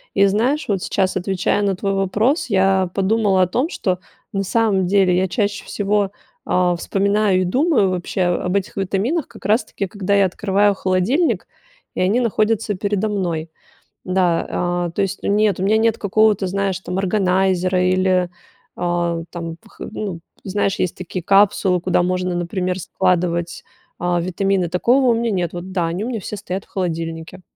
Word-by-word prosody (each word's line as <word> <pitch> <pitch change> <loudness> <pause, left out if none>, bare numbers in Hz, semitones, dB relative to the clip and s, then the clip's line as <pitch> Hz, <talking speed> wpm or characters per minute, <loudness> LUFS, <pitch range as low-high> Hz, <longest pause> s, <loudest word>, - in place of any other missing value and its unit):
И 200 - +5
знаешь, 240 +10 +1
вот, 195 -3 0
сейчас, 190 0 0
отвечая 190 +2 0
на 200 -2 +1
твой 195 +2 -2
вопрос, 205 - +1
я 190 -2 +2
подумала 195 -1 +2
о - - +1
том, 255 - 0
что 185 - -1 0.3
на 195 0 -1
самом 200 -2 +1
деле 190 -1 +3
я 185 +1 +2
чаще 205 +1 -1
всего, 205 -1 0 0.3
а, 180 -1 +2
вспоминаю 200 +2 +1
и - - +2
думаю 255 - +2
вообще 185 +1 -3
об 180 +1 0
этих 200 0 -2
витаминах 200 - -1
как - - -15
раз 215 +3 +2
таки, 200 - -4
когда 200 +1 -1
я 200 -1 +5
открываю 200 +2 +2
холодильник, 190 - +1 0.5
и - - -3
они 195 +6 +2
находятся 220 -2 +1
передо 205 +2 -1
мной. 170 -6 -2 0.6
Да, 175 -1 0
э, - - -10
то - - +1
есть 195 0 -2
нет, 205 -2 +2
у - - -1
меня 210 +3 +3
нет 225 0 +2
какого-то, 210 -1 +2
знаешь, 195 0 -1
там, 185 -1 -5
органайзера 185 -1 +1
или, 185 -1 +2 0.5
а, 175 -1 -1
там, 165 -2 -6
вх 215 - -21
ну, 200 -6 -5 0.2
знаешь, 200 0 -1
есть 180 - -1
такие 180 0 -5
капсулы, 195 -1 +3
куда 180 0 +2
можно, 180 0 -1
например, 180 +1 -2
складывать, 175 -1 -1 0.4
а, 175 0 0
витамины. 185 0 0
Такого 245 +10 +3
у - - +4
меня 230 0 0
нет, 180 -4 -1
вот, 175 +2 -7
да, 180 -3 0
они 175 +6 -3
у - - -3
меня 235 -3 -3
все 210 - -6
стоят 195 -1 -5
в - - -35
холодильнике. 165 -1 -4
190 Hz, 170 wpm, -20 LUFS, 180-205 Hz, 0.6 s, И